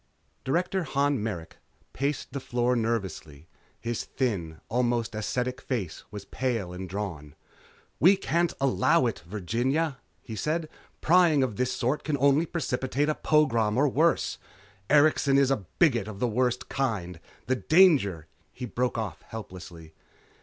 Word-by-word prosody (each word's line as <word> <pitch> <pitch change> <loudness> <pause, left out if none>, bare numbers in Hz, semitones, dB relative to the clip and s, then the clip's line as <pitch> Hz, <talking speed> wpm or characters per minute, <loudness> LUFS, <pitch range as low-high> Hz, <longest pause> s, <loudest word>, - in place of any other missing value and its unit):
_ - - -41
Director 180 +6 0
Han 140 -4 0
Merrick 95 -7 -5 0.4
paced 140 +1 -2
the 140 - -2
floor 125 -1 0
nervously. 95 -10 -3 0.3
His 115 -1 -3
thin, 90 - -3
almost 120 -1 0
ascetic 125 +4 -2
face 100 - -4
was 105 -1 -8
pale 115 -7 -2
and 90 0 -6
drawn. 85 -7 -5 0.6
"We 190 +7 +6
can't 170 -1 0
allow 135 +3 +3
it, 115 - -1
Virginia," 120 - -1 0.2
he 110 - -7
said, 155 +8 -2 0.3
"Prying 165 -4 +5
of 120 -5 -2
this 125 +2 0
sort 130 +4 -1
can 150 -2 -1
only 140 +4 +3
precipitate 145 -2 -1
a - - +2
pogrom 120 -10 +2
or 145 +3 +4
worse. 160 +5 +1 0.5
Erikson 145 -2 +4
is 135 -1 +4
a 110 -8 -1
bigot 100 - +3
of 110 -2 -7
the 125 - +1
worst 125 +2 0
kind. 100 -11 -2 0.3
The 130 +1 0
danger 140 - +4 0.2
" - - -39
He 125 - -6
broke 125 +1 -1
off 100 -7 -4
helplessly. 85 -7 -9
125 Hz, 145 wpm, -27 LUFS, 105-145 Hz, 0.6 s, We